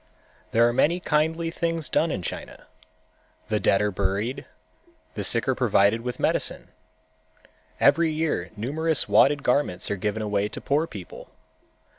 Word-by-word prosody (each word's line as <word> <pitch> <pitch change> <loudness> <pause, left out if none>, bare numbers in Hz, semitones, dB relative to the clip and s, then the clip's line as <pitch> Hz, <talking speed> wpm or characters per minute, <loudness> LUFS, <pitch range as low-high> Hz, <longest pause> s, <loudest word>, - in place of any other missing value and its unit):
There 115 +1 +4
are 120 - 0
many 155 +8 +2
kindly 160 0 0
things 165 -2 -2
done 165 - +1
in 95 - -3
China. - - -7 0.8
The 105 - +1
dead 100 0 +2
are 105 - 0
buried, 100 +8 -2 0.7
the 105 - -4
sick 115 +5 +1
are 130 - +3
provided 115 -3 +2
with 125 +1 -5
medicine. - - -1 1.1
Every 165 -1 +4
year 155 0 -1
numerous 155 +8 0
wadded 145 0 +4
garments 125 -10 0
are 100 - -1
given 105 +2 -2
away 105 -1 -1
to - - -7
poor 150 +4 0
people. 100 - -10
125 Hz, 145 wpm, -25 LUFS, 105-155 Hz, 1.1 s, There